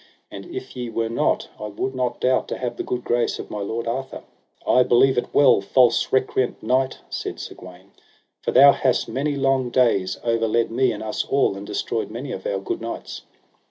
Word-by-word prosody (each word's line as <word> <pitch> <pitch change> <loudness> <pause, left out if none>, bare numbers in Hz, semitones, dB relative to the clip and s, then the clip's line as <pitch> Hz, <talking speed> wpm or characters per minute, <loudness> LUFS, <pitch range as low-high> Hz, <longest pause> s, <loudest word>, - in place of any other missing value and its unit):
And - - -9
if 370 - -8
ye 125 -2 -4
were 115 0 -2
not, 115 - 0
I 105 - -5
would 120 +6 -3
not 125 -2 -2
doubt 130 0 +1
to - - -4
have 120 -2 -3
the - - -4
good 125 -1 -3
grace 120 0 0
of - - -8
my 105 - -4
lord 110 +3 -3
Arthur. 130 +3 -4 0.4
I 125 - +4
believe 130 +2 +4
it 120 - -2
well, 130 -8 +5
false 120 +3 +3
recreant 130 -1 0
knight, 130 +3 +1
said - - -4
Sir - - -7
Gawaine; 90 +2 -14 0.5
for - - -3
thou 140 +2 +8
hast 130 -3 +1
many 140 +5 -2
long 135 -2 +1
days 115 -7 +2
overled 115 0 +1
me 125 +1 +2
and 110 -1 -6
us 110 - -2
all, 135 -7 +1
and 100 +1 -8
destroyed 115 - -2
many 120 +5 -6
of 95 - -5
our 100 - -1
good 95 - -4
knights. 115 0 -6
120 Hz, 200 wpm, -22 LUFS, 110-130 Hz, 0.5 s, thou